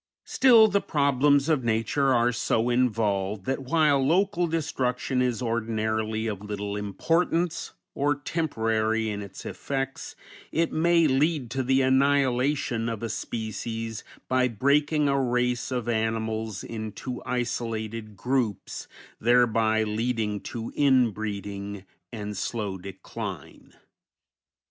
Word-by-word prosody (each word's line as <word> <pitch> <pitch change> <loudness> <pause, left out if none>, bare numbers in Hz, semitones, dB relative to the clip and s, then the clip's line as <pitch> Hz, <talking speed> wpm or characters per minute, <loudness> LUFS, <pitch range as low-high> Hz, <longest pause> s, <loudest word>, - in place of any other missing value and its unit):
Still, 235 -4 +6
the 200 -1 +1
problems 140 0 +2
of 155 -5 +2
nature 115 +5 +1
are 120 -1 +3
so 115 0 0
involved 105 -5 0
that 135 +1 -1
while 145 0 +3
local 180 +4 +2
destruction 130 -5 -1
is 125 -1 0
ordinarily 110 -1 -1
of 105 -3 -3
little 105 -1 -4
importance, 165 - 0 0.2
or 145 +1 +1
temporary 115 -8 0
in 105 0 -4
its 100 -2 -9
effects, 135 -1 -4 0.4
it 165 +1 +1
may 170 +1 +4
lead 145 -2 +1
to 135 - -1
the 130 +1 +2
annihilation 130 -2 +2
of 115 -1 -5
a 115 - -2
species 110 0 -4 0.2
by 130 0 +3
breaking 145 +6 +2
a 140 -1 +2
race 125 -1 0
of 125 -3 -3
animals 110 -2 -1
into 115 +3 -6
isolated 115 -3 -3
groups, 120 -1 -2 0.3
thereby 115 -2 +3
leading 110 -1 -1
to 115 +3 -6
inbreeding 105 -6 0 0.3
and 105 -3 -5
slow 105 -1 -2
decline. 95 +1 -8
120 Hz, 115 wpm, -26 LUFS, 110-140 Hz, 0.4 s, Still